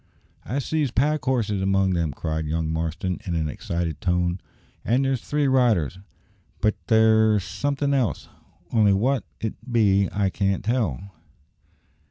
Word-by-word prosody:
"I 125 - -3
sees 145 +1 0
pack 145 +3 +1
horses 110 -7 0
among 95 0 +2
them," 85 -3 0
cried 80 +3 -3
young 80 0 -1
Marston 85 +3 -2
in 90 -5 -3
an 80 -2 0
excited 85 +2 -4
tone; 90 0 0 0.4
"an' 125 +4 +2
there's 135 -3 0
three 150 +3 0
riders; 110 - +2 0.6
but 110 - +2
there's 110 -2 +4
som'thin' 140 +3 -1
else, 130 -6 0 0.4
only 105 -3 +4
wot 125 +6 +1 0.2
it 110 - -3 0.2
be 100 -4 +3
I 100 -1 0
can't 100 0 -1
tell." 100 - -1
100 Hz, 140 wpm, -24 LUFS, 90-125 Hz, 0.6 s, there's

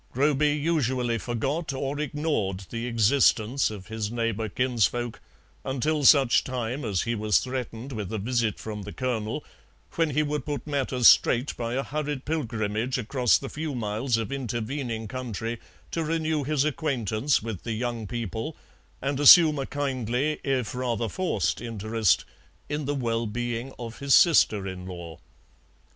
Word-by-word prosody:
Groby 145 +2 +2
usually 130 -7 0
forgot 135 +7 -2
or 140 +2 -3
ignored 140 -11 -2
the 115 +1 -3
existence 120 +1 +3
of 100 -3 -8
his 110 -1 -4
neighbour 115 -2 -1
kinsfolk 120 0 0 0.4
until 145 +3 -1
such 135 -3 +6
time 125 +2 -3
as 100 -6 0
he 115 - -1
was 105 -2 +2
threatened 125 -1 -4
with 105 -5 -5
a 110 - -2
visit 115 0 -1
from 105 -1 -6
the 100 +1 -7
Colonel, 125 +1 -2 0.5
when 165 -1 +1
he 150 +2 +1
would 150 0 -2
put 145 -4 -4
matters 135 -4 +2
straight 125 +3 +5
by 115 0 -3
a 135 - 0
hurried 145 -2 -3
pilgrimage 115 -5 -1
across 125 0 +2
the 135 - -7
few 150 0 -4
miles 115 +2 -1
of 115 +3 -3
intervening 120 -2 -3
country 115 -2 -4 0.3
to 165 - -1
renew 160 -1 0
his 145 0 +1
acquaintance 135 -6 0
with 110 -5 -5
the 115 - -3
young 115 -1 -3
people 115 - -4 0.5
and 140 0 -1
assume 150 +1 +8
a 135 - -3
kindly 135 0 -1
if 130 -5 -1
rather 120 -2 -1
forced 100 - -1
interest 110 -2 +1 0.4
in 150 0 -3
the 145 +1 -1
well 115 -3 -1
being 120 +3 -3
of 115 -1 -7
his 140 -1 +4
sister 110 - +5
in 95 -1 -6
law. 85 -3 -8
125 Hz, 155 wpm, -26 LUFS, 110-140 Hz, 0.5 s, assume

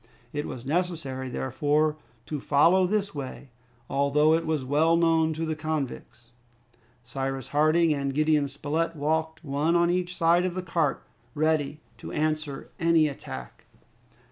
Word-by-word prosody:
It 145 0 -3
was 125 0 -7
necessary, 150 -5 -2
therefore, 150 +4 0 0.3
to 150 +2 -4
follow 170 +7 +4
this 200 0 -1
way, 135 -2 -7 0.4
although 140 +3 +3
it 165 0 0
was 155 -4 -1
well 155 +5 +3
known 165 -1 +3
to 160 +1 -3
the 160 -1 -2
convicts. 150 -6 -5 0.7
Cyrus 135 +1 -4
Harding 155 +2 +3
and 140 -1 -2
Gideon 150 0 +2
Spilett 150 +4 -2
walked 160 +2 -1
one 150 +3 0
on 170 0 +3
each 180 0 -2
side 170 +2 +4
of 180 -1 -2
the 185 - -3
cart, 165 -5 0 0.3
ready 155 -1 0 0.2
to - - -8
answer 155 -2 -2
to - - -6
any 165 -2 +4
attack. 65 - -8
155 Hz, 145 wpm, -27 LUFS, 140-165 Hz, 0.7 s, follow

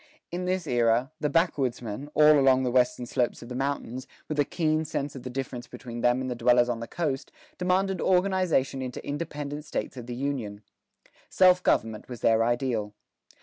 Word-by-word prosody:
In 180 +1 -3
this 185 -1 -1
era, 120 0 +2
the 150 - 0
backwoodsmen, 135 - -1
all 150 0 +7
along 130 -1 +4
the 125 - 0
western 125 0 +2
slopes 120 0 -1
of 120 - -11
the 125 - -5
mountains, 130 -2 -3 0.2
with 150 -1 -3
a - - +6
keen 155 +1 0
sense 145 -2 -4
of 130 - -7
the 125 - -6
difference 125 -1 -5
between 120 -1 -8
them 120 +2 +3
and 130 - -3
the 125 - -2
dwellers 120 0 +3
on 120 -1 -1
the 115 - -6
coast, 145 -6 -3 0.3
demanded 185 +1 +1
organization 180 -8 +2
into 125 -1 -6
independent 145 -1 -4
States 145 - -4
of 120 -1 -8
the 120 - -5
Union. 120 -6 -3 0.7
Self 180 -1 +5
government 110 -9 0
was 120 -3 -8
their 115 0 +4
ideal. 115 -3 -1
130 Hz, 185 wpm, -27 LUFS, 120-150 Hz, 0.7 s, all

